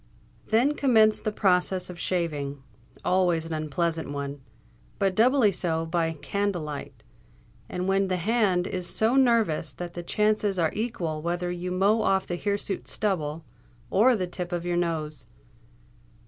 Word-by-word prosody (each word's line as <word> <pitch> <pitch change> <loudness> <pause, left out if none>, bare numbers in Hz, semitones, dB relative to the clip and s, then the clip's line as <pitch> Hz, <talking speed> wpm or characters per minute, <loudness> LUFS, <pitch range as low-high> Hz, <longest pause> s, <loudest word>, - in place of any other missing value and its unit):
Then 245 +7 +3
commenced 220 -7 +3
the 215 - +1
process 185 -2 +1
of 180 -1 -9
shaving—always 160 +1 -2
an 165 - -5
unpleasant 160 +1 -2
one, 140 0 -5 0.6
but 195 -1 +1
doubly 235 +1 +4
so 165 -3 -1
by 165 0 0
candle 200 +2 -2
light, 140 -5 -7 0.7
and 180 +1 -3
when 195 0 +2
the 185 -1 0
hand 195 -2 +1
is 180 -2 -3
so 225 +4 +2
nervous 230 - +3
that 175 +4 -7
the 175 - -5
chances 210 +2 +1
are 165 -3 +1
equal 175 -9 -3
whether 175 +2 -2
you 180 +1 -4
mow 200 +5 +3
off 190 -2 +2
the 175 - -3
hirsute 200 +1 -2
stubble 160 -6 -2 0.5
or 235 +6 +5
the 185 -4 -1
tip 180 0 -6
of 175 -1 -3
your 175 0 0
nose. 155 -7 -2
180 Hz, 145 wpm, -26 LUFS, 165-205 Hz, 0.7 s, or